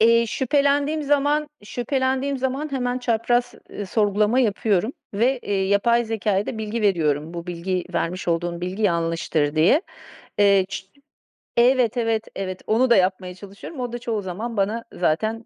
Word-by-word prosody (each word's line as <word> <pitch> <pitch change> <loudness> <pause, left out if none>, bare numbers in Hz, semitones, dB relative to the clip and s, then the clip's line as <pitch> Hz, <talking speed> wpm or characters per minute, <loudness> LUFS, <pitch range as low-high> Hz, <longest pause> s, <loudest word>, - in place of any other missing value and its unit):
Eee, 230 +1 +5
şüphelendiğim 285 +4 +1
zaman, 290 +1 +1 0.2
şüphelendiğim 265 +3 -1
zaman 265 +3 -2
hemen 250 -1 -1
çapraz, 240 0 0 0.2
ııı, 205 - -6
sorgulama 210 +4 +2
yapıyorum 215 0 +1 0.2
ve, 250 +5 +2
eee, 195 -1 0
yapay 235 +4 +3
zekâya 210 -3 -1
da 220 - -4
bilgi 220 +1 -3
veriyorum. 160 -5 +1
Bu 170 0 -6
bilgi 180 +1 -2
vermiş 180 +1 -2
olduğun 170 0 -1
bilgi 185 +4 -4
yanlıştır 165 -5 0
diye. 170 - +4 0.6
Eee, 200 -2 +5
ç 195 0 -6 0.7
evet, 245 -1 +4
evet, 225 -2 0
evet, 185 -1 -4
onu 240 +4 +3
da 235 - +6
yapmaya 185 -1 +1
çalışıyorum. 200 - -10
O 245 -1 -3
da 240 - -5
çoğu 230 -3 -2
zaman 210 +5 -5
bana 210 +4 0
zaten, 215 +7 -1
220 Hz, 150 wpm, -23 LUFS, 185-245 Hz, 0.7 s, da